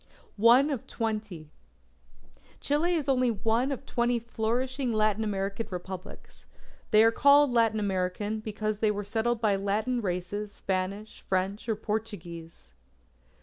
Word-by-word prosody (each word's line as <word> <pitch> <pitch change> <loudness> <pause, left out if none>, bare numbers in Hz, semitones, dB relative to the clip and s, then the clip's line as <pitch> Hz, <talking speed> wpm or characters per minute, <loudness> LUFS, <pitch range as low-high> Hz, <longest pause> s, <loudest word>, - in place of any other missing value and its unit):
ONE 250 +6 +6
OF 265 -6 -4
TWENTY 210 -9 -4 1.1
Chile 325 +5 +1
is 300 -4 -2
only 255 -2 +3
one 230 +4 0
of 275 0 -5
twenty 240 -1 +1
flourishing 240 +3 -2
Latin 215 0 +1
American 200 +1 -2
Republics. 185 +1 -9 0.4
They 215 0 +6
are 225 - +5
called 285 +2 +5
Latin 225 -2 +2
American, 200 +2 -1
because 215 -1 -3
they 215 - +2
were 205 0 -2
settled 225 +3 0
by 215 -3 +2
Latin 215 +5 -1
Races, 200 +2 -3
Spanish, 195 +2 -4
French, 195 +4 -1
or 220 - +2
Portuguese. 175 - -6
215 Hz, 130 wpm, -28 LUFS, 195-240 Hz, 1.1 s, ONE